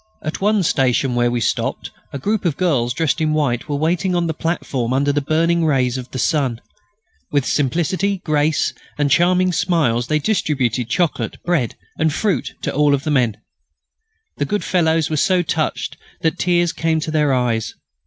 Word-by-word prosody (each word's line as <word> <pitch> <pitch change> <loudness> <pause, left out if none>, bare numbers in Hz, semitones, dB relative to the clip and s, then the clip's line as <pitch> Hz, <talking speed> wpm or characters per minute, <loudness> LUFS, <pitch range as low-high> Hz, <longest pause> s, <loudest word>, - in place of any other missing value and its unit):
At 155 +4 -4
one 210 0 +2
station 135 -3 +1
where 120 0 +2
we 120 0 -1
stopped 110 - -2 0.2
a - - -4
group 210 +9 -1
of 170 -6 0
girls 135 -10 +1
dressed 130 +2 0
in 155 -1 +1
white 145 -3 0
were 145 - 0
waiting 175 +5 0
on 175 -1 +1
the 160 - -1
platform 140 -7 -2
under 140 +2 +2
the 145 +1 0
burning 165 +4 +1
rays 130 -5 +1
of 130 -1 -6
the - - -6
sun. 130 -4 0 0.7
With 145 -3 +1
simplicity, 175 +7 0
grace, 155 -1 +1 0.2
and 145 -1 +1
charming 180 +1 +3
smiles 150 -10 +1
they 155 - +2
distributed 130 - 0
chocolate, 170 +4 -1
bread, 165 -10 0 0.2
and 160 -1 +2
fruit 175 - -1
to - - -2
all 145 -1 +3
the 145 +3 -3
men. 120 -7 +2 1.0
The 145 - 0
good 205 +8 -2
fellows 160 -3 +1
were 155 - 0
so 180 +4 +2
touched 160 -1 -2 0.2
that 165 +2 0
tears 175 -1 +2
came 165 -1 0
to 155 - -3
their 150 -2 +2
eyes. 120 -4 0
155 Hz, 175 wpm, -19 LUFS, 130-170 Hz, 1.0 s, charming